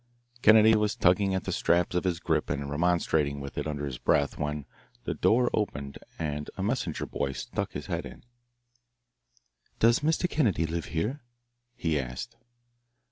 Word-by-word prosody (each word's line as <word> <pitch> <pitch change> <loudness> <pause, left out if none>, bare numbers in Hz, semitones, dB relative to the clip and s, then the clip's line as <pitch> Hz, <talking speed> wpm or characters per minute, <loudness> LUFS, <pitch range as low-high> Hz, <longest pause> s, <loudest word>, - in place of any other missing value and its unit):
Kennedy 110 0 +7
was 105 -1 +1
tugging 95 +2 +3
at 95 - -2
the - - -3
straps 85 +1 +2
of 90 - 0
his 85 -3 0
grip - - 0
and 70 0 -3
remonstrating 80 -3 +1
with 70 0 -7
it - - -2
under 75 -1 -3
his 65 -4 -5
breath, 70 -1 +2
when 75 -1 -3 0.4
the - - -2
door 120 +2 +3
opened 70 -10 -2 0.2
and 75 -2 -3
a 95 - -2
messenger 105 -7 -1
boy 70 - -2
stuck - - -4
his - - -5
head - - -3
in. - - -13 1.5
"Does 115 +1 +4
Mr. 160 +4 +1
Kennedy 105 - +1
live 80 +1 -3
here?" 110 - -2 0.5
he 80 -7 0
asked. 65 - -6
85 Hz, 160 wpm, -28 LUFS, 75-105 Hz, 1.5 s, Kennedy